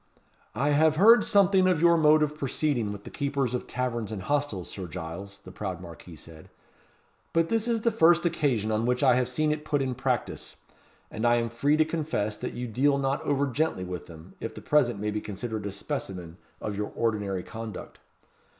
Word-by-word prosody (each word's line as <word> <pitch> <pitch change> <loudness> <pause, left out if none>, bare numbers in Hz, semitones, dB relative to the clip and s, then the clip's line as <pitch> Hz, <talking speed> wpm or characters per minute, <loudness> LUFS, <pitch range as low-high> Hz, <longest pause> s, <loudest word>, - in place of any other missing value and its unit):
"I 140 +6 +1
have 155 +1 +4
heard 225 +8 +7
something 190 -2 +4
of 180 -4 +2
your 170 +1 +5
mode 155 -1 +5
of 150 0 -2
proceeding 135 -5 -1
with 100 0 -8
the - - -10
keepers 140 -3 -1
of 125 - -3
taverns 120 -4 -3
and 100 -3 -5
hostels, 145 -10 -1
Sir 95 -3 -6
Giles," 90 +6 -7
the 95 - -12
proud 95 -2 -5
marquis 85 -1 -11
said; 80 +1 -13 0.8
"but 165 0 +2
this 225 0 0
is 230 -2 0
the 230 - +2
first 175 -4 +4
occasion 140 -10 +1
on 110 +2 0
which 125 0 +1
I - - +6
have 125 0 +1
seen 150 +4 +1
it 150 0 -3
put 150 -1 0
in 130 -2 -1
practice, 125 -1 -2 0.6
and 110 - -5
I 120 0 +4
am 115 -1 0
free 145 +6 +2
to 155 - +4
confess 150 -10 -2
that - - -5
you 125 0 -4
deal 140 +5 +2
not 135 +1 0
over 140 0 +1
gently 140 -6 -1
with 90 -1 -6
them, 80 +1 -13
if 115 -1 -6
the - - -7
present 125 -8 +2
may 105 +1 -2
be 105 0 -3
considered 110 0 -5
a - - -4
specimen 95 - -5 0.2
of 105 - -4
your 105 +1 -3
ordinary 105 -5 -1
conduct. 110 -2 -8
125 Hz, 205 wpm, -27 LUFS, 105-150 Hz, 0.8 s, heard